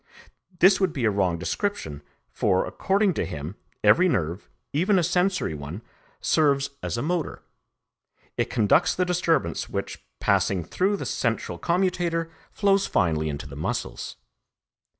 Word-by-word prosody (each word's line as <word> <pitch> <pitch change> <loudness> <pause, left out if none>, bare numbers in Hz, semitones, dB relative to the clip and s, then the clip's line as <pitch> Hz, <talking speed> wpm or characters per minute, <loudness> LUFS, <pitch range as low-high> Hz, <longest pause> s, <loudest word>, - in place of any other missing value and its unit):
This 190 +3 +5
would 185 -4 +2
be 130 -4 -1
a 110 - +4
wrong 95 -4 +1
description, 90 - -3 0.3
for, 95 - +1
according 195 0 +1
to - - -1
him, 75 +6 -6 0.3
every 170 - +5
nerve, 85 - -2 0.2
even 185 +7 +3
a 180 - +3
sensory 180 - +1
one, 75 +8 -7 0.4
serves 140 -3 +2
as - - -3
a 120 - -1
motor; 170 0 -2 0.9
it - - -1
conducts 110 -5 +3
the 180 - +1
disturbance 165 - 0
which, - - -4 0.2
passing 95 -2 +2
through 190 - 0
the - - -5
central 115 -7 -2
commutator, 175 -2 0 0.2
flows 200 -1 +2
finally 80 -3 +1
into 70 -1 -5
the - - -9
muscles. - - -4
145 Hz, 140 wpm, -25 LUFS, -, 0.9 s, This